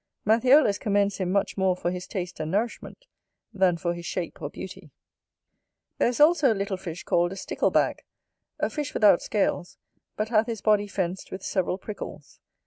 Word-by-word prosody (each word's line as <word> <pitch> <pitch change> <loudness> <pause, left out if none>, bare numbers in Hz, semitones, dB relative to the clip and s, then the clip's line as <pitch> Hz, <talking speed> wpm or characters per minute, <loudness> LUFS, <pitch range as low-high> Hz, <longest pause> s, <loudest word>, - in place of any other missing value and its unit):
Matthiolus 230 0 +5
commends 200 -1 +1
him 185 -2 -2
much 200 +1 0
more 190 -1 +2
for 175 -1 -2
his 180 0 -6
taste 180 -2 -5
and 155 - -3
nourishment, 225 - -3 0.5
than 185 -3 +2
for 170 0 -1
his 170 -1 -7
shape 180 -2 -4
or - - -3
beauty. - - -9 1.1
There - - +4
is 245 +2 -2
also 300 -3 +5
a - - +1
little 195 0 -2
fish 180 -2 -7
called 175 +1 +1
a - - -7
STICKLEBAG, 195 - 0 0.6
a - - 0
fish 295 -3 -4
without 205 -5 +5
scales, 195 -4 -1 0.4
but 215 +1 -1
hath 220 -1 +3
his 225 -3 -4
body 210 -1 +3
fenced 185 -2 -3
with 190 0 -7
several 185 -1 -1
prickles. 205 +2 -9
200 Hz, 175 wpm, -26 LUFS, 180-215 Hz, 1.1 s, Matthiolus